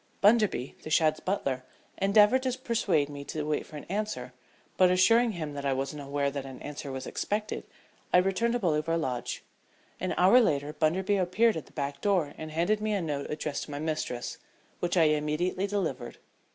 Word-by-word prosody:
Bunderby, 205 Hz, -, +3 dB
the -, -, -8 dB
Shadd's 155 Hz, -1 st, +3 dB
butler, 135 Hz, -10 st, -2 dB, 0.4 s
endeavored 210 Hz, +5 st, +5 dB
to 255 Hz, -1 st, -1 dB
persuade 220 Hz, -, +1 dB
me 145 Hz, -1 st, -7 dB
to 155 Hz, +1 st, -3 dB
wait 150 Hz, 0 st, -2 dB
for 155 Hz, -, -9 dB
an -, -, -8 dB
answer, 190 Hz, -12 st, -3 dB, 0.4 s
but 185 Hz, -1 st, +5 dB
assuring 225 Hz, +6 st, +4 dB
him 155 Hz, -5 st, -5 dB
that 140 Hz, -1 st, -5 dB
I 140 Hz, -1 st, +1 dB
wasn't 135 Hz, +2 st, -3 dB
aware 140 Hz, 0 st, -1 dB
that 140 Hz, -1 st, -4 dB
an 135 Hz, -1 st, -9 dB
answer 145 Hz, -1 st, -6 dB
was 130 Hz, 0 st, -5 dB
expected 210 Hz, +1 st, -3 dB, 0.5 s
I -, -, +6 dB
returned 195 Hz, +6 st, +2 dB
to 245 Hz, -, +1 dB
Bolivar 165 Hz, -3 st, +1 dB
Lodge. 130 Hz, -7 st, -3 dB, 0.6 s
An 185 Hz, -, -2 dB
hour 190 Hz, +8 st, +7 dB
later 145 Hz, -7 st, 0 dB
Bunderby 190 Hz, +7 st, +1 dB
appeared 195 Hz, +5 st, +3 dB
at 160 Hz, -, -6 dB
the -, -, -19 dB
back 140 Hz, -1 st, -4 dB
door 180 Hz, -8 st, +1 dB
and 155 Hz, -, -5 dB
handed 175 Hz, +7 st, +1 dB
me 215 Hz, 0 st, 0 dB
a 200 Hz, -, 0 dB
note 145 Hz, -3 st, -3 dB
addressed 150 Hz, -1 st, -3 dB
to -, -, -16 dB
my 145 Hz, -, -4 dB
mistress, 155 Hz, -5 st, -3 dB, 0.4 s
which 175 Hz, +1 st, 0 dB
I 165 Hz, -, +6 dB
immediately 155 Hz, +5 st, +1 dB
delivered. 200 Hz, -4 st, -3 dB
160 Hz, 190 wpm, -29 LUFS, 145-200 Hz, 0.6 s, hour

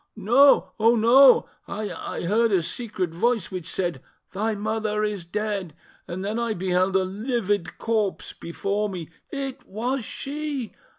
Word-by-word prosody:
"No! 240 Hz, +7 st, +5 dB
oh 225 Hz, +2 st, +5 dB
no!... 250 Hz, +4 st, +7 dB, 0.2 s
I 210 Hz, +1 st, -5 dB
heard 220 Hz, +6 st, +2 dB
a 185 Hz, -4 st, +3 dB
secret 205 Hz, -3 st, -3 dB
voice 230 Hz, +6 st, 0 dB
which 180 Hz, -3 st, -5 dB
said, 175 Hz, -8 st, -2 dB, 0.3 s
'Thy 215 Hz, +3 st, -1 dB
mother 215 Hz, 0 st, -1 dB
is 205 Hz, -4 st, -2 dB
dead!'... 200 Hz, -3 st, -3 dB, 0.3 s
And 185 Hz, +3 st, -5 dB
then 215 Hz, +3 st, -1 dB
I 230 Hz, -2 st, -1 dB
beheld 185 Hz, +1 st, +1 dB
a 190 Hz, -, +4 dB
livid 205 Hz, -3 st, -2 dB
corpse 220 Hz, -4 st, -1 dB
before 200 Hz, +5 st, -2 dB
me... 175 Hz, -4 st, -7 dB, 0.2 s
It 275 Hz, -2 st, -5 dB
was 245 Hz, +5 st, -2 dB
she! 285 Hz, 0 st, -4 dB
210 Hz, 140 wpm, -25 LUFS, 185-235 Hz, 0.3 s, no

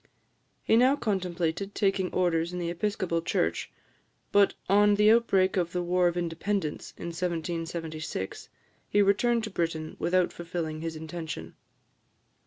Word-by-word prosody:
He 225 Hz, -, +4 dB
now 255 Hz, +4 st, +5 dB
contemplated 185 Hz, -, -2 dB
taking 195 Hz, -2 st, +1 dB
orders 170 Hz, -2 st, +1 dB
in 180 Hz, -, -5 dB
the 170 Hz, -1 st, -2 dB
Episcopal 175 Hz, -2 st, -1 dB
Church, 165 Hz, -, -1 dB, 0.6 s
but 200 Hz, -1 st, +4 dB
on 205 Hz, +1 st, +5 dB
the 210 Hz, +1 st, +5 dB
outbreak 195 Hz, -5 st, +3 dB
of 175 Hz, -2 st, 0 dB
the 180 Hz, -1 st, -1 dB
War 180 Hz, +1 st, +2 dB
of 175 Hz, 0 st, -1 dB
Independence 170 Hz, 0 st, -2 dB
in 170 Hz, -, -5 dB
1776 165 Hz, -, -4 dB, 0.4 s
he 205 Hz, 0 st, +4 dB
returned 230 Hz, +4 st, +2 dB
to 215 Hz, -, -4 dB
Britain 165 Hz, -3 st, -2 dB
without 180 Hz, 0 st, +2 dB
fulfilling 165 Hz, -2 st, -4 dB
this 165 Hz, 0 st, -4 dB
intention. 155 Hz, -, -6 dB
175 Hz, 135 wpm, -28 LUFS, 165-200 Hz, 0.6 s, now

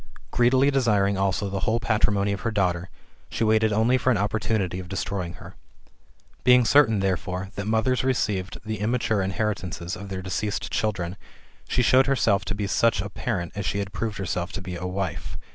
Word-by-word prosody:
Greedily 130 Hz, +3 st, +4 dB
desiring 105 Hz, -7 st, +2 dB
also 95 Hz, +1 st, 0 dB
the 100 Hz, +4 st, 0 dB
patrimony 105 Hz, -3 st, +1 dB
of 100 Hz, -, -3 dB
her 115 Hz, -, -1 dB
daughter, 90 Hz, -4 st, 0 dB, 0.4 s
she -, -, -2 dB
waited 110 Hz, 0 st, +3 dB
only 115 Hz, +5 st, +3 dB
for 130 Hz, -, +1 dB
an 120 Hz, -, +3 dB
opportunity 105 Hz, -2 st, -1 dB
of 90 Hz, -1 st, -8 dB
destroying 95 Hz, -2 st, -3 dB
her. -, -, -12 dB, 0.9 s
Being 125 Hz, -1 st, +6 dB
certain, 115 Hz, -7 st, +5 dB
therefore, 95 Hz, 0 st, -2 dB
that 100 Hz, +1 st, -5 dB
mothers 115 Hz, +4 st, +1 dB
received 105 Hz, -8 st, -1 dB
the 110 Hz, -1 st, -3 dB
immature 110 Hz, -1 st, 0 dB
inherit 100 Hz, +3 st, -1 dB
ances 90 Hz, 0 st, -5 dB
of 100 Hz, -1 st, -8 dB
their 95 Hz, -1 st, -5 dB
deceased 100 Hz, +3 st, -3 dB
children, 95 Hz, -4 st, -1 dB, 0.5 s
she 125 Hz, -, +2 dB
showed 130 Hz, +2 st, +5 dB
herself 110 Hz, -7 st, +2 dB
to 100 Hz, -, -2 dB
be 105 Hz, 0 st, -2 dB
such 110 Hz, +1 st, +2 dB
a 100 Hz, +1 st, -4 dB
parent, 85 Hz, -2 st, -3 dB
as 100 Hz, -, -4 dB
she -, -, -1 dB
had 100 Hz, 0 st, -3 dB
proved 110 Hz, 0 st, -3 dB
herself 90 Hz, -1 st, -3 dB
to 100 Hz, -, -3 dB
be 90 Hz, -1 st, -5 dB
a 90 Hz, +1 st, -4 dB
wife. 95 Hz, -1 st, -4 dB
100 Hz, 185 wpm, -25 LUFS, 95-110 Hz, 0.9 s, Being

